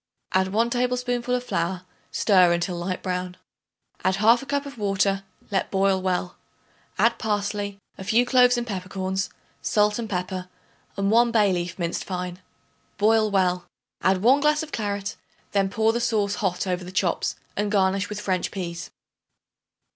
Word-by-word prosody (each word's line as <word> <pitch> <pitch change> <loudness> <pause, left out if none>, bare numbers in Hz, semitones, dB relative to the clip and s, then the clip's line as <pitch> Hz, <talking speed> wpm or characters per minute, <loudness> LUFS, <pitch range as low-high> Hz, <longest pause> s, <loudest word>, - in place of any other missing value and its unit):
Add 190 0 +3
1 230 +3 +2
tablespoonful 250 0 0
of 250 - -2
flour; 175 -3 -2 0.3
stir 185 -4 +4
until 175 +1 -1
light 180 +2 -3
brown. 180 -1 -3 0.7
Add 185 0 +2
1/2 230 +6 +4
cup 285 0 -1
of 275 -5 -9
water; 195 -1 +1 0.3
let 195 -2 0
boil 195 -1 +2
well; 180 -1 -1 0.6
add 230 0 +3
parsley, 205 -1 -2 0.2
a - - -5
few 230 +5 +3
cloves 250 -1 +5
and 240 - -1
peppercorns, 190 -2 -3 0.3
salt 210 +1 +2
and 225 -2 -4
pepper 180 0 -3 0.5
and 200 +1 +1
1 235 +1 +5
bay 210 -4 +4
leaf 175 -1 -3
minced 170 -2 -2
fine. 180 -1 -4 0.6
Boil 215 +1 +4
well. 180 -3 +1 0.3
Add 190 0 +2
1 260 +5 +6
glass 300 +2 +2
of 310 - -9
claret; 205 -2 -3 0.3
then 195 -1 +2
pour 220 +2 +2
the 235 - -1
sauce 215 -4 +1
hot 185 -2 0
over 180 -1 -2
the 180 - -8
chops, 185 -2 0 0.2
and 205 0 -1
garnish 195 0 +2
with 210 0 -4
French 185 -3 -1
peas. 175 -2 -5
200 Hz, 160 wpm, -25 LUFS, 185-225 Hz, 0.7 s, 1